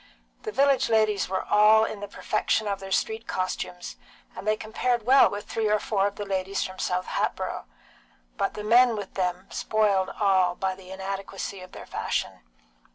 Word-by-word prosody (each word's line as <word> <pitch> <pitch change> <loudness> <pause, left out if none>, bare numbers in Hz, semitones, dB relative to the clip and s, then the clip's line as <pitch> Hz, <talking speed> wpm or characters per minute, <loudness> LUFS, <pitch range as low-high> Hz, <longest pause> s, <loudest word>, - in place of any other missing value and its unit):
The 435 - -5
village 275 - +3
ladies 215 -4 +2
were 190 0 -1
all 215 +1 +5
in 215 - -5
the 205 - -6
perfection 215 +1 -1
of 200 -1 -2
their 195 0 -9
street 220 +3 -1
costumes, 180 -1 -4 0.4
and 195 - -8
they 215 0 +2
compared 230 +2 -1
well 265 -3 +6
with 205 +1 -6
three 225 -1 -1
or 210 - +4
four 200 -2 0
of 200 - -6
the 205 - -5
ladies 195 0 -1
from 185 0 -7
South 180 0 -1
Hatboro', - - -2 0.7
but - - -1
the 210 - -5
men 235 +2 +5
with 205 -2 -6
them 180 0 -2
spoiled 200 -3 +1
all 190 -4 +3
by 190 0 -1
the 185 -1 -14
inadequacy 195 0 -5
of 185 - -12
their - - -9
fashion. - - -3
200 Hz, 180 wpm, -26 LUFS, 190-220 Hz, 0.7 s, well